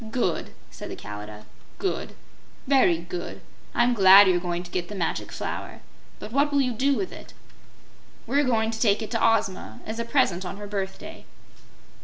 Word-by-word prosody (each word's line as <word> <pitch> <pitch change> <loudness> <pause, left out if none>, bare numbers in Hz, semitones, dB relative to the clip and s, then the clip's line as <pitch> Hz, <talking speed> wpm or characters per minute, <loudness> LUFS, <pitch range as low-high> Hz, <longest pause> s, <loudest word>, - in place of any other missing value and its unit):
"Good!" 220 -8 -1 0.2
said - - -8
the - - -5
Kalidah. 105 +1 -9 0.3
"Good! 385 - -3 0.5
Very 260 - +4
good! 175 - -6 0.4
I'm 245 +1 +3
glad 195 -2 +8
you're 180 -1 +3
going 175 0 -3
to 175 - -12
get 175 -1 -2
the 210 - -6
Magic 175 -4 -2
Flower. - - -5 0.4
But 215 - -9
what 285 +4 +2
will 285 -1 +3
you 250 -2 0
do 275 +5 +2
with 375 - -3
it?" - - -12 0.9
"We're 280 +5 +2
going 225 -4 +1
to 225 - -5
take 215 -2 +2
it 215 - -7
to 230 -2 0
Ozma, 205 - 0
as 220 +1 -5
a - - 0
present 230 -8 +1
on 185 +1 -6
her 205 - -7
birthday." 195 -2 -6
205 Hz, 180 wpm, -25 LUFS, 175-245 Hz, 0.9 s, glad